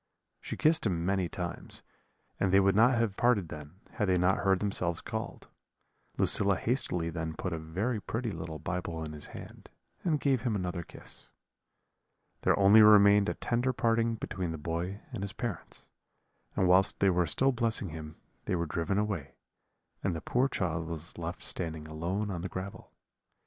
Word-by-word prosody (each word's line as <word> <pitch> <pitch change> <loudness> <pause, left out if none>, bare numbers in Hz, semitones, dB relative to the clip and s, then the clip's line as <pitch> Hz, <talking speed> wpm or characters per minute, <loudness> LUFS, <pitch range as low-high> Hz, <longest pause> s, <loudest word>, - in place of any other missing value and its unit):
She - - -6
kissed 155 -6 +4
him 85 -3 -1
many 95 -2 +1
times, 90 -1 -6 0.6
and 95 - +2
they 95 - +6
would 95 0 +4
not 120 +3 +5
have 115 -4 0
parted 110 -8 +2
then, 75 +5 -10
had 105 -5 -1
they 90 - +4
not 90 +2 +3
heard 95 -1 +2
themselves 90 -4 -1
called. - - -6 0.7
Lucilla 100 -1 +3
hastily 90 -9 -1
then 80 -1 -4
put 90 +2 -3
a 80 - -3
very 95 +9 -2
pretty 115 +2 -3
little 80 -2 -6
Bible 85 0 -4
in 75 -1 -6
his 75 - -9
hand, - - -11 0.3
and 155 -5 +1
gave 135 -4 +2
him 120 -4 0
another 90 -2 -2
kiss. - - -10 1.1
"There - - +3
only 100 +2 +7
remained 105 -1 +7
a - - -2
tender 125 +2 0
parting 115 -1 +1
between 95 -5 -4
the 80 - -4
boy 85 +6 -3
and 115 -6 -5
his 100 -1 -4
parents; 110 -5 -5 0.7
and 95 - +2
whilst 95 +2 +4
they 100 -1 +4
were 90 -1 +2
still 135 - +3
blessing 115 -5 0
him 80 0 -8 0.3
they - - 0
were 85 -1 0
driven 85 +4 -1
away, 100 -9 -2 0.7
and 95 -3 0
the 80 - -4
poor 125 +2 +1
child 85 - -2
was 85 0 -6
left 85 +1 -5
standing 80 -3 -3
alone 90 +7 -2
on 90 -3 -4
the 95 - -4
gravel. 95 +2 -7
95 Hz, 175 wpm, -30 LUFS, 85-105 Hz, 1.1 s, only